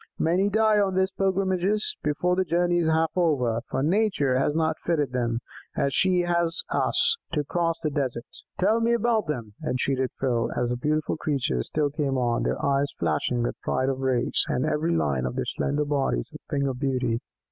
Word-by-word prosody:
Many 180 +5 +2
die 215 0 +3
on 195 -2 +1
these 190 0 +2
pilgrimages 190 +1 0
before 165 +5 +1
the 190 - +2
journey 175 0 +1
is 165 - +1
half 160 0 +2
over, 130 -10 +1
for 135 - -1
Nature 155 -7 +2
has 145 +2 +1
not 160 -1 0
fitted 150 -6 0
them, 120 -2 -1 0.3
as 140 - 0
she 185 -1 +3
has 170 -1 0
us, 470 -1 +2 0.2
to 150 -2 +1
cross 165 +2 -1
the 155 - 0
desert." 130 -4 -2 0.3
"Tell 215 +5 +3
me 230 +1 +2
about 230 -3 +1
them!" 120 -8 -4
entreated 130 -2 0
Phil, 125 -3 0
as 120 -1 0
the 125 - 0
beautiful 155 +5 -1
creatures 130 - -1
still 150 -2 0
came 140 -3 -1
on, 120 -2 +1
their - - -1
eyes 140 0 +1
flashing 85 +9 0
with 120 - -3
pride 130 +1 0
of 135 -1 -2
race, 130 -2 +1
and 125 - 0
every 155 +2 0
line 65 - 0
of 60 - -5
their - - -1
slender 150 +1 -1
bodies 135 - -1
a - - -9
thing 140 -1 0
of 130 -2 -3
beauty. 125 -4 0
150 Hz, 190 wpm, -26 LUFS, 130-175 Hz, 0.3 s, die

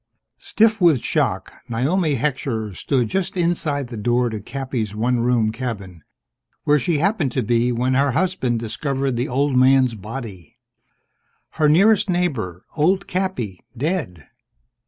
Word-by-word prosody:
_ - - -27
Stiff 220 -2 +2
with 160 -8 +5
shock, - - -1 0.2
Naomi 145 +7 +1
Heckscher 120 -6 -2
stood 125 +1 0
just 190 - -2
inside 165 -5 0
the 120 - -7
door 120 +3 +1
to 110 - -4
Cappy's 125 -4 -4
one 120 +3 +1
room 115 -2 +2
cabin, 100 -9 -6 0.6
where 150 -1 +3
she'd 160 +4 0
happened 175 - +1
to 130 - 0
be 120 +2 +1
when 125 +2 0
her 135 0 +2
husband 160 -8 0
discovered 135 +5 -2
the 120 +2 -2
old 135 +2 +1
man's 130 -1 +4
body. 105 - -8 1.0
Her 155 -2 +2
nearest 200 +6 +4
neighbor 135 - -2
old 180 +5 +2
Cappy 180 - -3
dead. 140 - -3
130 Hz, 140 wpm, -21 LUFS, 115-160 Hz, 1.0 s, with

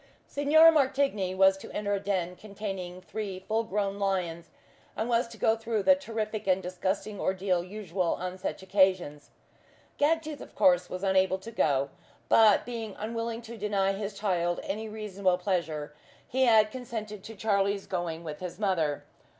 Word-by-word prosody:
Signor 310 +3 +6
Martigny 265 - +1
was 190 0 +5
to - - -10
enter 205 -1 -1
a 200 - +1
den 185 -3 -2
containing 195 -3 -6
three 200 -1 -5
full 220 +4 -1
grown 200 -1 -2
lions, 180 -4 -1 0.5
and 220 - -1
was 235 0 +2
to 230 -1 -12
go 220 +1 +3
through 225 -2 -2
the 280 - +7
terrific 220 -6 -4
and 190 0 +2
disgusting 190 +3 -3
ordeal 185 -2 0
usual 185 -2 -2
on 185 +1 -5
such 185 - -4
occasions. 185 -6 +1 0.7
Gagtooth, 310 -1 +1
of - - -12
course, 180 -1 +4
was 185 +1 -5
unable 190 -1 +3
to 190 +4 -10
go; 140 -9 +1 0.4
but, 220 -3 +6
being 225 -4 -5
unwilling 230 +1 -4
to 230 0 -9
deny 195 -2 +1
his 200 0 -5
child 175 -4 0
any 215 +3 -4
reasonable 200 -4 0
pleasure, 165 -6 -2 0.3
he 260 +1 +2
had 215 -3 +5
consented 215 -5 -6
to 225 - -8
Charlie's 200 -1 0
going 170 -3 -3
with 150 -2 -6
his 180 -2 -6
mother. 170 -8 0
200 Hz, 160 wpm, -29 LUFS, 185-220 Hz, 0.7 s, the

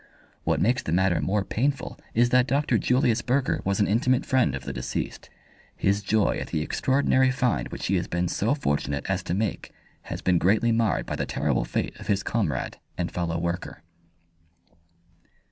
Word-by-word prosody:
What - - +1
makes 125 +5 +2
the - - -4
matter 90 0 +2
more 100 +1 0
painful 140 +4 -1 0.2
is 120 +1 +3
that 125 0 +4
Dr. 145 +2 +2
Julius 125 -3 +2
Burger 130 +1 0
was 100 0 0
an 105 - +4
intimate 125 +5 +2
friend 130 - +2
of 70 - -6
the 70 - -5
deceased. 60 -1 -4 0.5
His 100 +1 +1
joy 105 +1 +1
at - - -5
the 75 - -1
extraordinary 130 - +2
find 125 - 0
which - - -6
he 95 - +2
has 85 - -2
been 90 +1 -1
so 110 +9 0
fortunate 70 - -1
as 95 0 0
to 90 - -2
make 105 -1 -2 0.4
has - - -4
been 90 -2 +3
greatly 110 +6 +3
marred 115 -4 +1
by - - -4
the - - -2
terrible - - 0
fate - - -2
of - - -10
his 100 -1 +1
comrade 85 - -2 0.2
and 85 -1 -2
fellow 85 -1 -2
worker. 85 -2 -4
100 Hz, 180 wpm, -26 LUFS, 85-125 Hz, 0.5 s, that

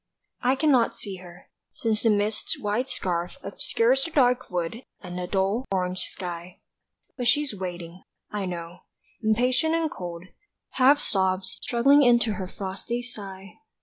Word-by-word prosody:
I 255 +2 +3
cannot 265 -5 +3
see 195 -2 -6
her, 175 -1 -14 0.2
since 220 -2 0
the 230 - +3
mist's 210 0 0
white 220 +6 -1
scarf 175 -7 -1
Obscures 245 +6 +2
the - - -3
dark 255 -4 +3
wood 175 +3 -2 0.2
and 180 -2 -8
the 180 0 -3
dull 200 +7 0
orange 185 -1 0
sky; 175 -1 -6 0.6
But 245 -2 -1
she's 290 +1 +3
waiting, 180 -2 -6 0.3
I 205 -2 -2
know, 170 0 -6 0.4
impatient 245 +8 +2
and 325 -2 0
cold, 170 -1 -6 0.5
half 270 +3 +5
Sobs 190 -4 +1
struggling 275 +5 +5
into 240 -4 +4
her 190 -3 -4
frosty 200 +6 -4
sigh. 200 -5 -9
205 Hz, 145 wpm, -26 LUFS, 180-245 Hz, 0.6 s, half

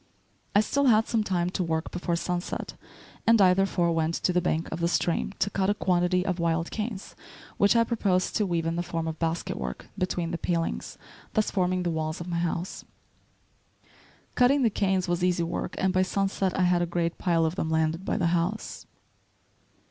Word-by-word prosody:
I 205 - +7
still 280 +6 0
had 220 -3 +4
some 225 -2 +1
time 180 -3 0
to 185 - -1
work 160 -1 -2
before 175 -1 -2
sunset, 175 +1 -3 0.5
and 230 -1 +6
I 185 -2 +6
therefore 180 -2 +1
went 165 0 0
to 180 - 0
the 180 - +2
bank 165 -2 -1
of 160 - -4
the 170 - +1
stream 170 +1 0
to 200 +1 0
cut 195 0 0
a 205 - +2
quantity 180 -1 +1
of 185 -2 -1
wild 165 0 0
canes 210 -2 -5 0.4
which 200 +3 +4
I 230 - +5
proposed 200 -6 0
to 210 - +1
weave 170 -2 -1
in 165 +1 -1
the - - +1
form 165 -1 -3
of 160 -1 -4
basket 165 0 -2
work, 65 -1 -6
between 175 -2 -2
the 170 - -3
palings, 170 -2 -2 0.4
thus 215 -2 +2
forming 185 -1 0
the 175 - 0
walls 155 0 -2
of 170 - -6
my 170 -1 -1
house. 175 +1 -3 1.5
Cutting 265 +3 +4
the 230 - +3
canes 190 -2 0
was 175 0 -1
easy 180 -1 +2
work, 170 - -3
and 190 -1 +1
by 185 - +3
sunset 195 0 0
I 185 - +2
had 180 -1 +3
a 175 - 0
great 170 0 -2
pile 165 -2 +2
of 160 - 0
them 160 - -2
landed 160 +2 0
by - - -1
the 190 - -1
house. 175 +5 -2
180 Hz, 200 wpm, -27 LUFS, 170-195 Hz, 1.5 s, I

